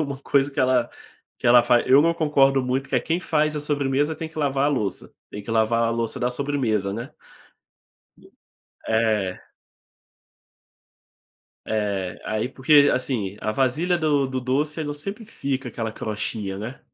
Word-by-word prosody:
uma 140 -3 -3
coisa 140 0 +2
que - - -1
ela 125 -2 +2 0.5
que - - -3
ela 120 0 +7
faz, 120 0 +3
eu 135 +3 +6
não 165 +1 +3
concordo 135 -4 +3
muito 130 +2 -2
que - - -3
é: - - +2
"Quem 165 +7 -1
faz 155 -3 0
a - - -2
sobremesa 145 +1 0
tem 160 +1 -6
que 160 - -10
lavar 140 -2 +1
a - - +3
louça, 110 -9 -3 0.2
tem 105 - -7
que 105 - -8
lavar 115 +1 +2
a 115 - +1
louça 115 -1 -2
da 125 0 +1
sobremesa.", 125 -7 -1
né? 115 +7 -6 1.8
É. 110 -4 +1 2.3
É. 100 -4 -2
Aí 110 +2 -2
porque 140 +2 +5
assim, 110 -6 -2
a 110 - -1
vasilha 140 +10 +1
do 150 -4 +2
do 130 0 -3
doce 145 +5 -1
ela 145 -1 -3
sempre 195 +10 -6
fica 135 - -4
aquela 115 -2 -4
crostinha, 105 -2 -4
né? 110 +6 -7
130 Hz, 165 wpm, -23 LUFS, 115-145 Hz, 2.3 s, ela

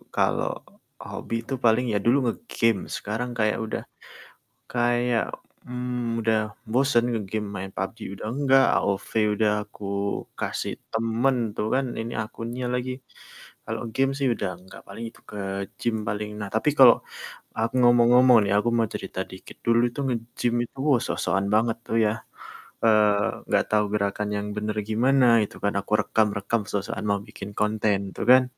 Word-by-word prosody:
kalau - - +1 0.5
hobi - - -5
itu 130 - -5
paling 115 +2 +4
ya - - +3
dulu 120 +4 +5
nge-game, 115 - 0 0.2
sekarang 110 +4 -3
kayak 110 -1 +2
udah 110 - -4 0.9
kayak, 120 0 +1 0.4
mmm, 125 -2 -3
udah 110 0 +2 0.3
bosen 130 -1 +3
nge-game, 105 0 -3
main 95 0 -5
PUBG 95 +4 -3 0.2
udah - - -6
enggak, 135 -1 +4
AOV 100 -1 -1 0.3
udah 110 -2 +3
aku 105 - -13 0.5
kasih - - -2 0.2
temen 115 +4 +1 0.2
tuh 105 - -1
kan, 135 0 +1
ini 115 +1 -5
akunnya 115 +3 -6
lagi. 125 +1 -1 0.7
Kalau - - -4
game 135 +2 +2
sih 140 -2 +1
udah 100 - -2
enggak 95 +1 -13
paling 115 - -7
itu - - -20
ke 105 - -7 0.4
gym 120 -2 0
paling. 105 +1 -3
Nah, 105 - -4
tapi 110 +7 +2
kalau 125 -3 +9 0.6
aku 115 +2 0
ngomong-ngomong 120 +1 +6
nih, 100 - 0
aku 105 - +1
mau 115 -1 +2
cerita - - -5
dikit, - - -11
dulu 115 0 +4
itu 120 - -6
nge-gym 120 0 -2
itu 120 - -15
wah 130 -5 +4
sok-sokan 95 +3 0
banget 115 +1 +2
tuh 115 - -1
ya. 105 - +2 0.7
Eee, 105 -3 +3
gak - - +4
tahu 105 0 +3
gerakan 105 0 -1
yang 100 0 -3
bener 105 0 -1 0.2
gimana 130 +4 +3 0.2
itu - - -13
kan, 100 - +1
aku 100 - -10
rekam-rekam 105 +1 +1
sok-sokan 100 +1 -3
mau 100 - +2
bikin 100 - -8
konten 105 -1 +1 0.2
tuh - - -3
kan. 130 0 +8
115 Hz, 155 wpm, -25 LUFS, 105-125 Hz, 0.9 s, kalau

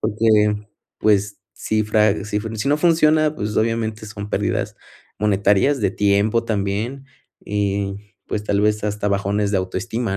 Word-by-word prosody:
porque, 105 -1 +2 0.3
pues, 105 -1 +1
si 110 0 -1
fra 105 -2 +2
si 105 -1 -2 0.2
si 125 +6 -2
no 145 - +3
funciona, 155 -2 +3
pues 105 -3 -4
obviamente 110 -1 -1
son 105 -1 -7
pérdidas, - - -1 0.4
monetarias. 105 +6 +2
De 100 - +1
tiempo 105 +3 +2
también. 110 +5 -2 0.4
Y 100 0 -3
pues 105 - -2
tal 100 -1 +1
vez 105 0 +1
hasta 105 0 -1
bajones 100 +1 0
de 100 - +2
autoestima, 95 +3 -3
105 Hz, 140 wpm, -21 LUFS, 100-110 Hz, 0.4 s, no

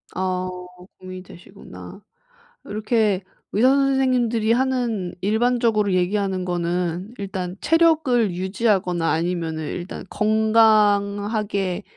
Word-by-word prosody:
아 185 0 -2 0.5
고민이 185 0 -9
되시구나. 95 - -13 0.6
이렇게 210 -2 0 0.3
의사 240 +5 +4
선생님들이 255 -5 +2
하는 240 -7 -1
일반적으로 220 -1 +1
얘기하는 190 0 0
거는 175 +3 -2
"일단 190 -2 -5
체력을 300 - +2
유지하거나 185 -3 0
아니면은 165 -1 -2
일단 175 +4 -6
건강하게 210 -2 +2
205 Hz, 255 characters per minute, -22 LUFS, 180-230 Hz, 0.6 s, 의사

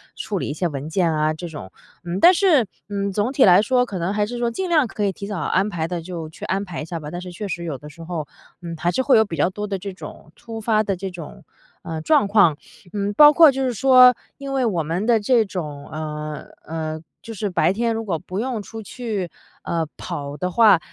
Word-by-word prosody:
处 200 -3 -3
理 - - -3
一 - - -3
些 170 +3 -1
文 145 0 -5
件 170 0 +1
啊， 155 0 +1
这 170 +2 -7
种。 145 -12 -8 0.4
嗯 175 +1 -3
但 360 - +8
是， 335 - +4 0.2
嗯 200 -1 -2
总 210 +6 -1
体 270 - +4
来 180 +1 +7
说， 250 +3 +2
可 200 -6 -6
能 175 +4 -1
还 210 0 +1
是 240 +3 -6
说 235 -1 +1
尽 365 +10 -3
量 310 -7 +3
可 210 - -4
以 200 - +2
提 200 +2 -8
早 205 -3 -4
安 190 +3 +1
排 165 -5 -2
的 175 -1 -4
就 165 -2 -6
去 155 - -9
安 195 +1 -1
排 180 -5 -6
一 - - -5
下 170 +1 -5
吧。 150 0 -8
但 175 - -5
是 180 - -8
确 205 +4 -6
实 175 -2 -4
有 155 -5 -4
的 150 +3 -11
时 165 +2 -12
候， 165 -3 -4 0.4
嗯 170 -1 -6
还 170 +2 0
是 260 - 0
会 265 -1 +5
有 220 - +5
比 170 - -6
较 160 +4 +2
多 210 +2 -5
的 200 -1 -2
这 195 +1 -6
种 185 - -11
突 225 -1 -8
发 215 -1 +2
的 200 -2 -1
这 190 +1 -5
种， 170 -4 -10 0.4
呃 160 -1 -5
状 285 - +3
况。 200 -7 +4 0.4
嗯 205 0 -1
包 295 +6 +9
括 320 -2 +8
就 270 0 -2
是 250 - 0
说 255 +2 +7 0.2
因 275 -1 -6
为 265 -2 +1
我 180 -8 0
们 170 +7 -2
的 235 -2 +4
这 225 +1 +3
种 150 -7 -6
呃 150 -1 -5 0.2
呃 160 0 -4 0.2
就 225 - -8
是 205 -1 -3
白 175 -1 +2
天 230 +2 0
如 225 - -3
果 185 -6 -2
不 185 +3 -6
用 240 -2 -2
出 220 +3 -9
去 210 -5 -4 0.3
呃 165 -1 -1
跑 140 0 -5
的 180 +5 -2
话， 210 -2 +6
195 Hz, 270 characters per minute, -22 LUFS, 165-225 Hz, 0.4 s, 包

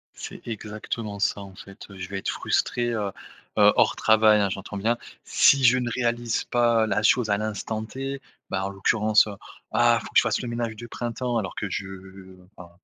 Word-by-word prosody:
C'est - - -8
exactement 105 -1 -5
ça. 100 0 0
En 95 -1 -11
fait, 100 +2 -12
heu, 100 - -12
je 95 0 -7
vais 100 - -4
être - - -3
frustré, 120 -1 0
heu 105 -3 -2 0.5
heu, 105 0 +7
hors - - +3
travail, 110 -1 +5
hein, 100 - +1
j'entends 100 +1 -6
bien, 115 +4 0 0.3
si 140 -1 +4
je 125 +1 +6
ne 120 -1 -2
réalise 120 -2 -1
pas 120 -2 +2
la 105 0 0
chose 115 -1 +3
à 100 - +3
l'instant 110 +1 -3
T. 135 +3 -6 0.3
Ben, 95 0 -1
en 95 - -2
l'occurrence, 105 +2 +3
heu: 105 - -6 0.4
«Ah, 120 +1 +4
il - - -12
faut - - -9
que - - +3
je - - +9
fasse 115 -2 0
le 125 - -5
ménage 115 -1 -3
de 120 +2 -9
printemps». 120 +1 -3
Alors 95 -4 -3
que 100 - -3
je 95 +1 -4 0.7
enfin, 90 -1 -12
110 Hz, 210 wpm, -25 LUFS, 100-120 Hz, 0.7 s, je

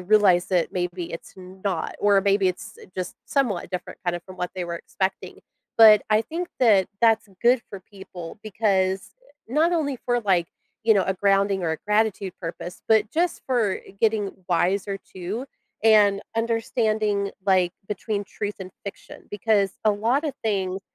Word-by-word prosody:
realize 185 -2 +4
that 180 -3 0
maybe 175 -1 -3
it's 165 - -9
not, 185 -1 -4
or 205 -1 +4
maybe 200 -1 +3
it's, 180 - -6
eh, - - -13
just 185 -1 -4
somewhat 225 -11 0
different, 180 -1 -5
kind 175 -1 -1
of, 175 - -9
from 185 -1 -12
what 180 - -2
they 180 -1 -3
were 170 0 -4
expecting; 190 +2 -4 0.4
but 215 -2 +9
I 215 +1 +3
think 345 +8 -5
that 210 -7 +5 0.2
that's 225 -2 +4
good 240 +1 +5
for 195 - -8
people 190 -2 -10
because, 195 -3 0 0.2
eh, 285 -4 -18
not 325 +4 +3
only 285 -5 0
for, 245 -1 +2
like, 180 -5 +1 0.4
you 220 -1 +6
know, 195 - +3
a 190 - 0
grounding 195 0 +2
or 165 - 0
a - - -2
gratitude 210 -3 +1
purpose, 175 +1 -6
but 220 -1 +4
just 345 +2 0
for 235 -7 +1 0.2
getting 215 -3 +2 0.2
wiser 195 +3 +1
too 195 +6 -6 0.4
and 205 -3 +5
understanding, 220 -3 0
like, 185 -3 +3 0.2
between 205 0 -3
truth 205 +1 -5
and 185 0 -7
fiction, 200 - -10
because 205 -2 +1
a 215 - +5
lot 230 +9 +1
of 295 - -1
things, 195 -3 -1
200 Hz, 170 wpm, -24 LUFS, 185-220 Hz, 0.4 s, but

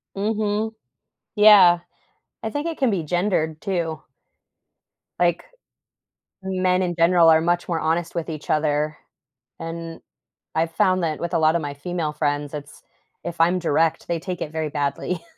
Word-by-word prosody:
Mhm. 215 +1 -1 0.6
Yeah. 200 -5 +7 0.6
I 220 - -2
think 290 +7 -3
it 330 - -4
can 265 -4 +2
be 180 -5 -1
gendered 160 -2 -1
too. 170 -6 -2 1.2
Like, 175 -1 +2 1.0
men 185 -1 +1
in 175 -1 -1
general 170 0 +5
are 160 0 +6
much 175 +1 0
more 170 -2 -1
honest 165 +2 -1
with 170 -1 -3
each 155 -2 -7
other, 150 0 0 0.6
and 165 0 -6 0.5
I've 165 +1 0
found 185 +2 +2
that 155 -2 -2
with 170 - -3
a - - +3
lot 155 0 +3
of 170 - -1
my 145 -1 -4
female 155 +1 -3
friends, 145 -1 -2
it's 145 -1 -9 0.4
if 170 -1 -6
I'm 175 +2 +4
direct, 165 0 +1
they 170 -1 0
take 180 0 -5
it 150 - -4
very 155 -2 -2
badly. 145 +4 -2
170 Hz, 155 wpm, -23 LUFS, 155-185 Hz, 1.2 s, Yeah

